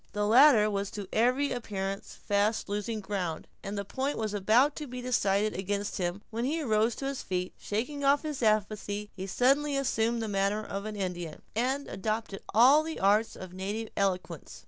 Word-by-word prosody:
The 210 0 0
latter 235 -1 +7
was 200 -1 -2
to 200 -2 -5
every 255 +5 +2
appearance 195 -4 -4
fast 205 +2 0
losing 210 +2 -3
ground, 185 -5 -3 0.2
and 200 +1 -5
the 200 - -3
point 270 +7 -2
was 215 -2 -2
about 225 +8 +3
to 300 - -5
be 250 0 -6
decided 215 -4 +1
against 200 +2 -3
him, 180 +3 -2
when 230 +1 -2
he 300 +6 0
arose 225 -5 +1
to 270 - -5
his 275 -1 -3
feet, 180 -1 -3
and - - -25
shaking 250 +8 -2
off 280 +2 +4
his 300 -4 -4
apathy, 210 -1 0
he 190 0 -5
suddenly 275 +7 +2
assumed 235 -3 0
the - - -2
manner 200 +1 0
of 200 +1 -5
an 215 0 -5
Indian, 175 -5 -4
and 260 +5 0
adopted 215 0 -3
all 255 +8 +7
the 320 +1 -5
arts 210 +3 +3
of 185 -1 -9
native 205 +4 -4
eloquence. 180 - -2
215 Hz, 190 wpm, -29 LUFS, 200-250 Hz, 0.2 s, latter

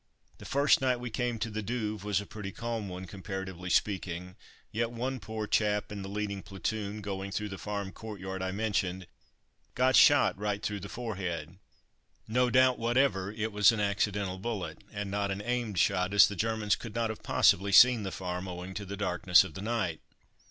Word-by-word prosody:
The - - -11
first 140 0 +3
night 130 -2 +1
we 120 -1 -5
came 120 0 -1
to 110 0 -3
the 110 +1 -3
Douve 110 -2 -3
was 105 -2 +1
a 100 - -6
pretty 100 -1 -7
calm 115 -2 -4
one, 90 +1 -6
comparatively 95 -2 -6
speaking; 90 -2 -1 0.4
yet 115 +1 -1
one 125 +3 -3
poor 110 -1 -5
chap 105 0 +1
in 100 -1 -5
the 95 - -6
leading 100 -1 -3
platoon, 100 +2 -4
going 100 -1 -4
through 105 +2 -3
the 95 -2 -7
farm 100 0 -4
courtyard 95 -4 -7
I 95 - -1
mentioned, 95 -3 -1 0.7
got 130 +1 +3
shot 145 -1 +6
right 105 -1 -2
through 105 -1 -2
the 100 +1 -8
forehead. 90 -7 -5 0.7
No 125 +3 +2
doubt 130 0 +4
whatever 115 -5 +1
it 110 +1 -3
was 105 +2 +6
an 115 - -3
accidental 100 -2 0
bullet, 95 -7 -4
and 100 -2 -4
not 100 0 -1
an 100 +1 -3
aimed 120 -4 -2
shot, 95 +2 +2
as 100 - +9
the 100 - -5
Germans 110 +1 +1
could 115 -3 -9
not 115 -1 0
have 110 - -9
possibly 100 +2 +3
seen 120 +3 +8
the 95 -2 -4
farm 90 0 -4
owing 90 +1 -6
to 100 +1 -5
the 100 +1 -5
darkness 90 -2 +4
of 95 -5 -8
the 95 - -7
night. 105 -7 -2
105 Hz, 195 wpm, -30 LUFS, 95-110 Hz, 0.7 s, as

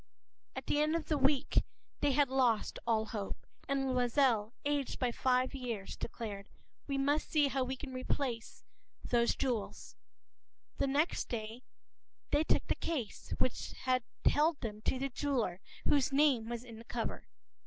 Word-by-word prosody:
p> - - -23
<INT>At - - -4
the 295 - +2
end 305 +2 +2
of 330 -1 -3
a - - +5
week 275 +1 +3 0.4
they 285 -2 +2
had 285 +1 +4
lost 250 -4 +2
all 220 -1 +3
hope. 210 -3 -5 0.2
And 270 -1 +1
Loisel, 245 -3 +3
aged 285 -2 0
by 250 -2 +1
five 255 +2 +2
years, 235 -7 -4
declared:— 200 -3 -5 0.4
“We 275 -1 -1
must 285 +3 +1
see 295 -3 +4
how 270 -1 +1
we 260 +1 -2
can 260 0 -8
replace 255 -2 -2 0.4
those 235 -1 +3
jewels.” 225 -6 -2 0.8
The - - +2
next 290 +5 +1
day 225 +1 -4 0.7
they 295 +1 +4
took - - +2
the - - +1
case 270 -11 -3
which 255 - -1
had 255 -1 +3 0.2
held 310 +1 +4
them 215 -3 -4
to - - +2
the 275 +1 -1
jeweler 245 -9 -1 0.3
whose 280 -2 +4
name 270 -5 +3
was 235 0 -4
in 230 -3 -10
the - - -10
cover. 235 -1 -3
255 Hz, 165 wpm, -34 LUFS, 230-280 Hz, 0.8 s, a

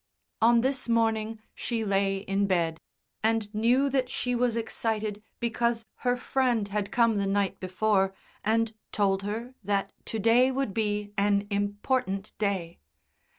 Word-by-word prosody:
On 235 +1 +6
this 265 -1 -1
morning 225 -1 +1
she 230 -2 -2
lay 195 -1 +1
in 195 +1 0
bed, 165 -4 0 0.4
and 220 -1 0
knew 240 +6 +3
that 255 -2 +1
she 250 -1 -1
was 245 -1 +1
excited 220 -2 -2 0.2
because 235 -1 0
her 245 0 +1
friend 245 -5 +1
had 200 0 -2
come 230 -3 +3
the 200 -1 0
night 200 0 0
before 195 +1 +1 0.3
and 225 +1 +1 0.2
told 195 -2 +1
her 225 +5 -4
that 200 0 -1
to 225 - -3
day 230 +4 +5
would 265 -5 -1
be 210 -1 -1
an 200 0 +2
important 205 0 -1
day. 190 -5 -1
215 Hz, 145 wpm, -28 LUFS, 200-235 Hz, 0.4 s, On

